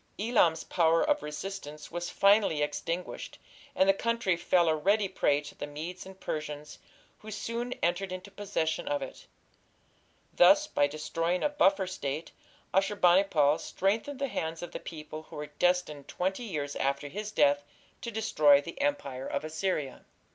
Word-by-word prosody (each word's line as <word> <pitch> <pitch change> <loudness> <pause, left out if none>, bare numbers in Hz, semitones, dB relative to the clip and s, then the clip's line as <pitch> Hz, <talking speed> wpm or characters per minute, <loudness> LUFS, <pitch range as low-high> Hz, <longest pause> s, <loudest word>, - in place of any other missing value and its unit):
Elam's 205 -7 +2
power 165 - +2
of 295 - +2
resistance 150 -1 -7
was 175 0 -3
finally 200 -7 +4
extinguished, 165 +4 -4 0.4
and 190 - +4
the 195 - +6
country 230 -2 0
fell 175 0 +2
a 160 - +3
ready 200 +6 +2
prey 145 -5 +1
to 150 - -10
the 145 - -6
Medes 165 +6 -7
and 190 0 -12
Persians, 150 -2 -5 0.4
who 215 - -10
soon 230 +4 -3
entered 180 +2 0
into 185 +2 -7
possession 195 -5 -2
of 145 -1 -1
it. 135 - -10 1.1
Thus, 295 +12 +6
by 145 - +2
destroying 165 +4 -2
a 295 - +3
buffer 195 -9 +3
State, 160 -4 -4 0.4
Ashur 195 +2 +2
bani 185 0 +5
pal 150 -5 +3
strengthened 220 +9 -1
the 275 +1 -1
hands 165 -7 -4
of 175 - -6
the - - -5
people 155 -1 -8
who - - -10
were 150 0 -6
destined 180 -6 +1
twenty 190 +6 -2
years 145 -8 -4
after 140 +1 -1
his 210 +7 -5
death 145 -5 +3 0.4
to 235 - -4
destroy 155 -10 +4
the 170 - -7
Empire 140 - -1
of 140 - -2
Assyria. 155 -3 -2
175 Hz, 160 wpm, -30 LUFS, 150-200 Hz, 1.1 s, the